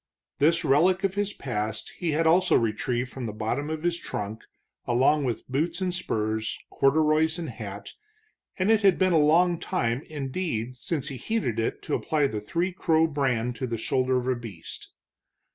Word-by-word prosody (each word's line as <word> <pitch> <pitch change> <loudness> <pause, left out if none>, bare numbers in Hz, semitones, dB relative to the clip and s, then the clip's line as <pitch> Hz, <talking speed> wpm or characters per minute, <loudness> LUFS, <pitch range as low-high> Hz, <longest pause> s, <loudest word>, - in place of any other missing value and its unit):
This 165 +3 +3
relic 175 +7 +3
of 195 -1 +1
his 205 0 -1
past 110 -4 -4
he 165 -4 0
also 165 +3 +4
had - - +4
retrieved 120 +3 -1
from 130 -3 -5
the - - -3
bottom 115 +8 -2
of 160 0 -4
his 175 0 0
trunk 105 +2 -5 0.4
along 135 +4 +3
with 120 -3 -3
boots 160 +7 -1
and 185 -2 -1
spurs, 110 -10 -2
corduroys 155 +3 +3
and 170 -2 -4
hat, 105 -3 -8 0.6
and 190 +3 +2
it 220 -1 +4
had 195 -4 +5
been 185 -1 +3
a 160 - +5
long 170 +3 +4
time, 125 -10 -1
indeed, 135 -4 -3
since 140 +2 -2
he 135 - -6
heated 125 - -1
it 115 - -2
to - - -4
apply 150 -2 +1
the 110 -6 -2
Three 170 - -1
Crow 160 -3 +3
brand 125 -6 0
to 130 - -3
the 115 -1 -3
shoulder 130 +3 +1
of 125 0 -2
a 130 - +2
beast. 110 -9 -9
140 Hz, 180 wpm, -26 LUFS, 120-170 Hz, 0.6 s, had